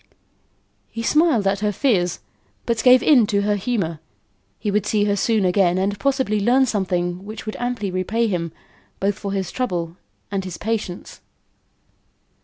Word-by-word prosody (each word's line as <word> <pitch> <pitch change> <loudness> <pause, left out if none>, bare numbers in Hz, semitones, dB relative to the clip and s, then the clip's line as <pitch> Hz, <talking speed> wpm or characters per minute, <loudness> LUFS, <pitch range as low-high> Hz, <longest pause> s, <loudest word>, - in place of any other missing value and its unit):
He 230 - -5
smiled 300 -6 +3
at 195 0 +1
her 210 0 0
fears, 185 - 0 0.4
but 230 -2 0
gave 250 +1 +6
in 250 -8 +5
to 200 -1 +1
her 205 0 +1
humour; 195 -7 -2 0.6
he 210 - -2
would 210 0 0
see 210 -1 +2
her 205 -1 +1
soon 215 -1 +1
again 180 -1 +3
and 200 +2 -1
possibly 265 -6 +1
learn 250 +6 +4
something 180 -5 -1
which 215 +2 -8
would 215 - -5
amply 240 -5 -2
repay 200 +6 0
him, 175 -6 -2 0.5
both 200 +1 +1
for 200 0 -6
his 190 -3 -2
trouble 175 -9 -3 0.3
and 195 -1 -1
his 185 -2 -6
patience. 215 -5 -4
205 Hz, 160 wpm, -21 LUFS, 185-230 Hz, 0.6 s, gave